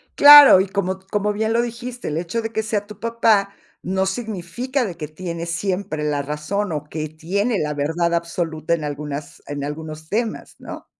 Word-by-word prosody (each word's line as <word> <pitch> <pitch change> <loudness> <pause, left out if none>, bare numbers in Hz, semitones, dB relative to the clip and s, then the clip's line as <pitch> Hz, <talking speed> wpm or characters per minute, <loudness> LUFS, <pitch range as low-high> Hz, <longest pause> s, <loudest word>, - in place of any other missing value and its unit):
Claro, 290 -8 +10
y 190 - +1
como 190 -1 -2
como 210 0 0
bien 220 +1 -1
lo 235 - +3
dijiste, 240 -1 -5
el 150 - -2
hecho 175 +7 -2
de 225 0 -5
que 220 - -1
sea 210 -1 -2
tu 210 -1 -12
papá 225 -4 +2 0.3
no 190 +1 -1
significa 225 +5 -3
de 180 -6 -4
que 150 - -5
tiene 170 +1 -6
siempre 180 -2 -2
la 145 -1 0
razón 150 +6 -3
o 150 -1 -3
que 155 0 -4
tiene 195 +9 -1
la 150 -1 -1
verdad 160 +4 -1
absoluta 170 -1 -2
en 160 -2 -1
algunas 145 0 -6
en 145 -1 -4
algunos 155 +1 -7
temas, 225 +1 -3
¿no? - - -9
185 Hz, 185 wpm, -21 LUFS, 155-215 Hz, 0.3 s, Claro